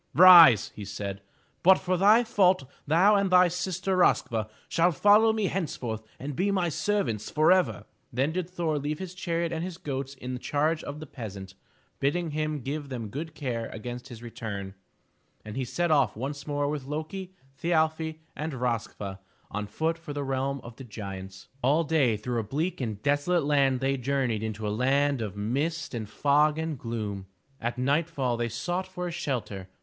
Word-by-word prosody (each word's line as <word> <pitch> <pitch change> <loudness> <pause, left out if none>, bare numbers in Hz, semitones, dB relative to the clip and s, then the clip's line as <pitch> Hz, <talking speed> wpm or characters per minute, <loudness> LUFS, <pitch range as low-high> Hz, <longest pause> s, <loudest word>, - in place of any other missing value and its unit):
Rise," 165 - +9
he 105 - -9
said, 100 0 -5 0.4
"but 190 +1 +7
for 185 0 -1
thy 210 +6 +6
fault 190 - +3 0.2
thou 175 +8 +5
and 200 -1 +2
thy 180 -1 +6
sister 185 +2 -2
Rosk'va 115 - +2 0.2
shall 175 +1 +3
follow 210 +7 +5
me 220 -2 0
henceforth 130 - -3 0.2
and 140 +2 -5
be 190 +6 +1
my 185 -3 +1
servants 140 - -1
forever." 155 - +3 0.3
Then 135 +5 0
did 180 0 -3
Thor 165 -4 -1
leave 150 +2 -2
his 185 0 -6
chariot 170 -2 -2
and 165 0 -2
his 180 -2 -5
goats 135 -3 -4
in 130 -1 -6
the 125 - -4
charge 155 +4 0
of 145 +1 -6
the 155 - -7
peasant, 100 -8 -8 0.5
bidding 160 +4 0
him 155 -1 -2
give 145 +3 -4
them 120 -5 -5
good 155 +7 -6
care 120 -5 -3
against 120 +3 -7
his 120 -1 -10
return, 100 -4 -6 0.7
and 105 0 -7
he 135 - -1
set 170 +7 -1
off 140 -7 +3
once 140 +4 -5
more 145 -1 0
with 145 -2 -3
Lo'ki, 170 +6 -5 0.2
Thi 165 - -6
arfi 160 -1 +1
and 155 +1 -4
Rosk'va 115 -6 -3 0.3
on 105 +1 -3
foot 160 +10 -1
for 150 -3 -7
the 145 0 -3
realm 135 0 -2
of 120 -1 -11
the 135 - -8
giants. 95 -4 -8
All 145 +6 +3
day 145 -8 +2
through 120 +3 -2
a - - -1
bleak 150 - -2
and 110 -5 -3
desolate 145 +4 +2
land 140 -3 +2
they 135 +1 +1
journeyed 130 -4 0
into 110 -1 -3
a 105 - -1
land 135 +3 +2
of 100 -2 -5
mist 145 +11 -2
and 110 -3 -4
fog 150 +5 +3
and 160 -1 -2
gloom. 105 -5 -4 0.3
At 120 +1 -2
nightfall 140 -1 0
they 120 0 -1
sought 175 - -3
for 180 -1 -5
a 175 - -3
shelter. 105 - -4
145 Hz, 185 wpm, -27 LUFS, 115-165 Hz, 0.7 s, Rise